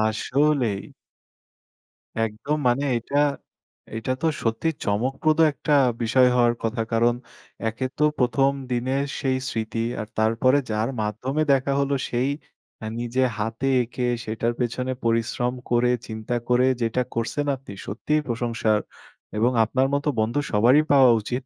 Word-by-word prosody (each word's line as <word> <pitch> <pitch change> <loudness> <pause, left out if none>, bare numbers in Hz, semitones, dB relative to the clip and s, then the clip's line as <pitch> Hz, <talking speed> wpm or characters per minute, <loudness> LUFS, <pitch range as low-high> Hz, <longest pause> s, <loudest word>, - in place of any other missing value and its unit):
আসলেই! 120 0 +1 1.4
একদম 115 +8 -2
মানে 125 +4 +2
এটা, 130 +5 -3 0.8
এটা 115 +3 -3
তো 165 - +2 0.2
সত্যি 115 +8 0 0.2
চমকপ্রদ 135 +9 0
একটা 150 +1 -2 0.3
বিষয় 125 +3 +4
হওয়ার 120 -1 +4
কথা। 115 +1 -1
কারণ, 120 +1 +3 0.5
একে 120 +4 -4
তো 150 - +2 0.2
১ম 135 +2 +3 0.2
দিনের 130 +3 0 0.2
সেই 130 -1 0
স্মৃতি। 115 0 -3 0.2
আর 105 - -6
তারপরে 115 +5 +3
যার 110 +3 0
মাধ্যমে 125 +8 -2
দেখা 135 +1 +1
হলো, 140 0 +1
সেই 125 +3 0 0.7
নিজে 120 +2 -1 0.2
হাতে 115 +5 -2
এঁকে, 125 +1 -3 0.2
সেটার 115 +2 -1
পেছনে 125 +1 -1
পরিশ্রম 115 +2 0 0.2
করে, 120 0 +3 0.2
চিন্তা 110 +2 -4
করে, 125 +1 +4 0.2
যেটা 115 +2 +1
করছেন, 115 +5 -2
আপনি 130 -6 -11
সত্যিই 150 +9 -1
প্রশংসার। 115 -2 0 0.6
এবং 120 +3 +3
আপনার 130 +4 +1
মতো 145 +1 0
বন্ধু 115 +6 +1
সবারই 120 +8 +5
পাওয়া 135 -3 +7
উচিত। 125 +4 -4
120 Hz, 130 wpm, -24 LUFS, 115-135 Hz, 1.4 s, পাওয়া